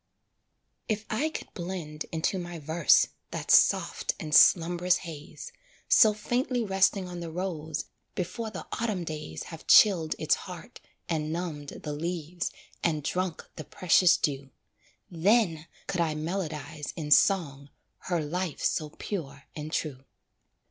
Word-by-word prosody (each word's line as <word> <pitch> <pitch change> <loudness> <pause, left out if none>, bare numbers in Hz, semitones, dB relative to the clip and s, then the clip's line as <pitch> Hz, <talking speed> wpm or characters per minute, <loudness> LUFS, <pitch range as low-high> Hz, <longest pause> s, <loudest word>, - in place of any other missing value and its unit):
If 215 0 -1
I 280 +9 +1
could - - -8
blend 170 -4 -5
into 165 +4 -1
my 175 -1 -6
verse 160 +1 +3 0.2
That - - -3
soft - - +3
and 155 -1 -5
slumb'rous 175 +3 +5
haze, 160 - -9 0.4
So 220 - +7
faintly 245 +3 -1
resting 195 -1 +2
on 175 -1 -7
the 170 -1 -5
rose 160 -3 -4 0.3
Before 220 +5 -3
the - - -7 0.2
autumn 210 -6 -1
days 150 - -6
Have 160 - -11
chilled 175 -7 +6
its 155 - +2 0.2
heart, 175 -3 -10 0.3
and 155 -2 -1
numbed 160 -4 -5
the 150 - -4
leaves, 170 +2 -3 0.3
And 155 -3 0
drunk 180 +1 -2
the 155 - -5
precious 180 +2 +4
dew, 140 -2 -2 0.6
Then 170 -2 +2 0.2
could 180 - -1
I 160 -2 0
melodize 155 -2 -4
in 150 -3 -5
song, 145 -4 +3 0.3
Her 175 -2 -1
life 175 +1 -3
so 155 -1 0
pure 145 -5 -6
and 150 0 -6
true. 135 -5 -3
170 Hz, 135 wpm, -28 LUFS, 155-185 Hz, 0.6 s, So